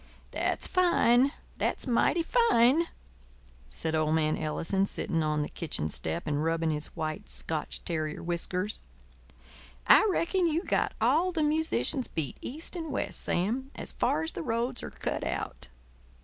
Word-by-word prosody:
"That's -, -, -1 dB
fine, 280 Hz, -8 st, +4 dB, 0.3 s
that's -, -, -1 dB
mighty 270 Hz, +7 st, +2 dB
fine," 325 Hz, -, +4 dB, 0.8 s
said 160 Hz, -1 st, -3 dB
old 155 Hz, 0 st, +2 dB
man 155 Hz, -1 st, +2 dB
Ellison, 190 Hz, +5 st, 0 dB
sitting 165 Hz, -4 st, +1 dB
on 150 Hz, -1 st, +1 dB
the -, -, -3 dB
kitchen 145 Hz, -, -2 dB
step 170 Hz, -, -1 dB
and 150 Hz, 0 st, 0 dB
rubbing 165 Hz, 0 st, +1 dB
his 150 Hz, 0 st, -1 dB
white, 155 Hz, -1 st, -4 dB
Scotch 160 Hz, -2 st, -3 dB
terrier 155 Hz, -3 st, -2 dB
whiskers. 180 Hz, +4 st, -1 dB, 1.0 s
"I -, -, +7 dB
reckon 360 Hz, 0 st, +1 dB
you've 330 Hz, +3 st, 0 dB
got -, -, 0 dB
all 360 Hz, +4 st, +3 dB
the 325 Hz, -3 st, 0 dB
musicians 305 Hz, -3 st, +1 dB
beat 155 Hz, -4 st, -4 dB
east 315 Hz, +8 st, -5 dB
and 325 Hz, -3 st, -4 dB
west, 265 Hz, -, -2 dB
Sam, 235 Hz, +10 st, -1 dB
as -, -, -5 dB
far 155 Hz, -, 0 dB
as 160 Hz, -, -1 dB
the -, -, -5 dB
roads 235 Hz, +6 st, -1 dB
are -, -, -6 dB
cut -, -, -3 dB
out." -, -, -4 dB
195 Hz, 150 wpm, -29 LUFS, -, 1.0 s, I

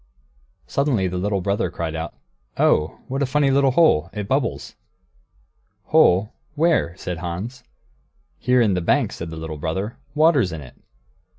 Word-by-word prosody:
Suddenly 135 Hz, -9 st, 0 dB
the 90 Hz, 0 st, -3 dB
little 100 Hz, 0 st, -1 dB
brother 100 Hz, +2 st, 0 dB
called 80 Hz, -1 st, -4 dB
out, 80 Hz, 0 st, -5 dB, 0.4 s
"Oh, 75 Hz, 0 st, +2 dB
what 135 Hz, +2 st, -3 dB
a 140 Hz, -, +1 dB
funny 140 Hz, +1 st, +2 dB
little 135 Hz, 0 st, +4 dB
hole! 125 Hz, -, +3 dB
It 105 Hz, -1 st, -4 dB
bubbles!" 130 Hz, -1 st, -1 dB, 1.1 s
"Hole? 95 Hz, +5 st, +3 dB, 0.2 s
Where?" 155 Hz, -, +1 dB
said 90 Hz, -2 st, -5 dB
Hans. 95 Hz, +9 st, -5 dB, 0.8 s
"Here 125 Hz, 0 st, +3 dB
in 105 Hz, -4 st, +3 dB
the 90 Hz, -, 0 dB
bank," 85 Hz, -, +2 dB
said 85 Hz, -, -6 dB
the 80 Hz, -, -7 dB
little 80 Hz, -1 st, -6 dB
brother; 95 Hz, +9 st, -3 dB, 0.2 s
"water's 150 Hz, -, +4 dB
in 80 Hz, -2 st, -6 dB
it." 65 Hz, -, -12 dB
100 Hz, 155 wpm, -22 LUFS, 85-135 Hz, 1.1 s, little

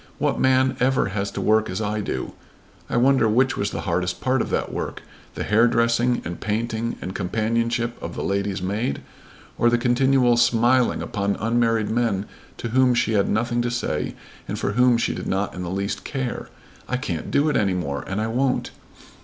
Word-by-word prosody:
What -, -, 0 dB
man 130 Hz, 0 st, +3 dB
ever 130 Hz, -5 st, +2 dB
has 100 Hz, 0 st, -2 dB
to -, -, -5 dB
work 110 Hz, 0 st, +3 dB
as 95 Hz, +2 st, -3 dB
I 105 Hz, 0 st, -1 dB
do?" 65 Hz, -10 st, -4 dB, 0.6 s
I -, -, 0 dB
wonder 130 Hz, -2 st, +4 dB
which 130 Hz, +4 st, +2 dB
was 100 Hz, -, -1 dB
the -, -, -4 dB
hardest 90 Hz, 0 st, -1 dB
part 130 Hz, -1 st, +1 dB
of -, -, -3 dB
that -, -, -2 dB
work, -, -, -4 dB, 0.3 s
the -, -, -3 dB
hairdressing 115 Hz, +2 st, +2 dB
and 85 Hz, 0 st, -6 dB
painting 115 Hz, +2 st, -2 dB
and 95 Hz, -, -5 dB
companionship 115 Hz, +4 st, -1 dB
of 85 Hz, -, -6 dB
the -, -, -3 dB
lady's 100 Hz, -1 st, -1 dB
maid 105 Hz, +6 st, -2 dB, 0.6 s
or 120 Hz, -, +5 dB
the 120 Hz, -, +3 dB
continual 125 Hz, 0 st, +3 dB
smiling 120 Hz, +1 st, +3 dB
upon 100 Hz, -1 st, -1 dB
unmarried 115 Hz, -1 st, +1 dB
men 110 Hz, -4 st, 0 dB, 0.3 s
to 120 Hz, -, -4 dB
whom 130 Hz, +1 st, +3 dB
she 120 Hz, -2 st, +1 dB
had 100 Hz, -2 st, +2 dB
nothing 120 Hz, +2 st, 0 dB
to 120 Hz, -, -1 dB
say 120 Hz, 0 st, -2 dB, 0.3 s
and -, -, -3 dB
for -, -, -1 dB
whom 125 Hz, +2 st, +4 dB
she 115 Hz, -, 0 dB
did -, -, -5 dB
not 95 Hz, +1 st, -1 dB
in 90 Hz, -, -6 dB
the 90 Hz, -, -4 dB
least 100 Hz, +2 st, -3 dB
care! 130 Hz, -3 st, -4 dB, 0.4 s
"I 125 Hz, -, 0 dB
can't 85 Hz, -10 st, -4 dB
do 145 Hz, +2 st, +2 dB
it 150 Hz, -, +1 dB
any 100 Hz, -4 st, +2 dB
more, 70 Hz, -6 st, -3 dB
and 95 Hz, +2 st, -2 dB
I 110 Hz, -, 0 dB
won't. 125 Hz, +3 st, 0 dB
115 Hz, 195 wpm, -23 LUFS, 100-120 Hz, 0.6 s, or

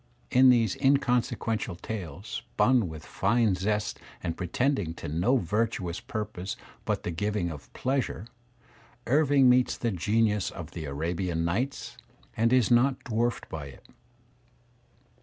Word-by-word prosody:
In 130 Hz, +1 st, +7 dB
these 115 Hz, -5 st, +4 dB
inconse 135 Hz, -3 st, +2 dB
quential 110 Hz, -6 st, -3 dB
tales, 95 Hz, -3 st, -6 dB, 0.2 s
spun 125 Hz, -8 st, +2 dB
with 80 Hz, -1 st, -9 dB
fine 110 Hz, +1 st, +2 dB
zest 105 Hz, +3 st, -1 dB, 0.2 s
and 85 Hz, -2 st, -2 dB
pretending 95 Hz, -, -1 dB
to -, -, -7 dB
no 85 Hz, -, +2 dB
virtuous 105 Hz, -4 st, -1 dB
purpose 105 Hz, -3 st, -5 dB, 0.3 s
but -, -, -1 dB
the -, -, -2 dB
giving 100 Hz, 0 st, -1 dB
of 75 Hz, -3 st, -10 dB
pleasure, 130 Hz, -7 st, -1 dB, 0.8 s
Irving 140 Hz, 0 st, +4 dB
meets 125 Hz, 0 st, +4 dB
the 115 Hz, -, -1 dB
genius 105 Hz, +2 st, +1 dB
of 85 Hz, -1 st, -8 dB
the 80 Hz, -3 st, -6 dB
Arabian 85 Hz, +4 st, -2 dB
nights 120 Hz, +11 st, -2 dB, 0.4 s
and 115 Hz, +1 st, +2 dB
is 125 Hz, -2 st, +4 dB
not 130 Hz, +3 st, +3 dB
dwarfed 120 Hz, +1 st, -1 dB
by 75 Hz, -3 st, -6 dB
it. 65 Hz, -, -14 dB
105 Hz, 135 wpm, -28 LUFS, 85-125 Hz, 0.8 s, In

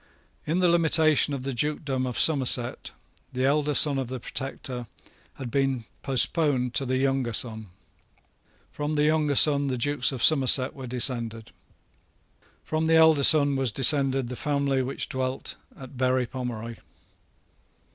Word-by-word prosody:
In 160 Hz, +3 st, -1 dB
the 185 Hz, -1 st, +2 dB
limitation 160 Hz, -3 st, +2 dB
of 135 Hz, -2 st, -5 dB
the 135 Hz, 0 st, -4 dB
dukedom 135 Hz, -1 st, -3 dB
of 125 Hz, -, -6 dB
Somerset, 130 Hz, -5 st, +1 dB, 0.4 s
the 130 Hz, +1 st, -2 dB
elder 145 Hz, +1 st, 0 dB
Son 140 Hz, -3 st, +5 dB
of 130 Hz, -, -4 dB
the 130 Hz, +1 st, -6 dB
Protector 125 Hz, -1 st, -6 dB, 0.5 s
had 125 Hz, -3 st, -8 dB
been 135 Hz, -3 st, -1 dB, 0.2 s
postponed 135 Hz, -2 st, 0 dB
to 135 Hz, -, -2 dB
the 130 Hz, +1 st, -1 dB
younger 135 Hz, -3 st, -1 dB
son. 110 Hz, -2 st, -1 dB, 1.0 s
From 150 Hz, +1 st, -4 dB
the 150 Hz, -, +1 dB
younger 150 Hz, -1 st, 0 dB
son 145 Hz, 0 st, +5 dB
the 130 Hz, -2 st, -3 dB
Dukes 145 Hz, +2 st, 0 dB
of 130 Hz, -3 st, -5 dB
Somerset 135 Hz, -3 st, +4 dB
were 135 Hz, -2 st, -10 dB
descended. 115 Hz, -2 st, -1 dB, 1.1 s
From 160 Hz, 0 st, -3 dB
the 165 Hz, -, +3 dB
elder 160 Hz, -3 st, +4 dB
son 145 Hz, -1 st, +4 dB
was 135 Hz, -3 st, -1 dB
descended 135 Hz, +1 st, +3 dB
the 125 Hz, -, -7 dB
family 140 Hz, -1 st, -1 dB
which 130 Hz, +2 st, -3 dB
dwelt 130 Hz, 0 st, -5 dB, 0.2 s
at 130 Hz, 0 st, -12 dB
Berry 130 Hz, 0 st, 0 dB
Pomeroy. 120 Hz, -3 st, -7 dB
135 Hz, 145 wpm, -25 LUFS, 125-145 Hz, 1.1 s, Son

